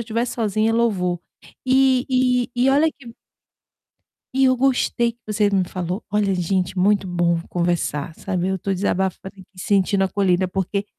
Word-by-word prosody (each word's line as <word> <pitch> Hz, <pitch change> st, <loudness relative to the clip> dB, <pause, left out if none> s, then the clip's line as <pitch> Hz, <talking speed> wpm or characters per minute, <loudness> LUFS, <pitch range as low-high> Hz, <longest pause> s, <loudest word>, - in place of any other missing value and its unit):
estiver 230 Hz, +1 st, -1 dB
sozinha, 220 Hz, -2 st, 0 dB
é -, -, 0 dB
louvor. 185 Hz, -7 st, 0 dB, 0.4 s
E 260 Hz, -1 st, +3 dB
e 250 Hz, -1 st, +2 dB
e 250 Hz, +2 st, +3 dB
olha 300 Hz, +4 st, +3 dB
que 240 Hz, -6 st, -14 dB, 1.2 s
e 270 Hz, -, +4 dB
eu 255 Hz, 0 st, +3 dB
gostei 245 Hz, -2 st, +1 dB
que 235 Hz, -, -36 dB
você 210 Hz, -1 st, +1 dB
me 195 Hz, -2 st, +2 dB
falou, 180 Hz, +3 st, -4 dB
olha, 205 Hz, -2 st, +1 dB
gente, 185 Hz, +1 st, -1 dB
muito 195 Hz, +1 st, +2 dB
bom 175 Hz, -1 st, 0 dB
conversar, 170 Hz, -3 st, -1 dB
sabe, 185 Hz, -1 st, -2 dB
eu 190 Hz, -, 0 dB
estou 195 Hz, +1 st, -2 dB
desabafando 190 Hz, 0 st, -1 dB
aqui, 195 Hz, -2 st, -15 dB
sentindo 195 Hz, +1 st, +1 dB
acolhida 190 Hz, -1 st, +1 dB
porque, 195 Hz, +2 st, -2 dB
200 Hz, 160 wpm, -21 LUFS, 185-235 Hz, 1.2 s, e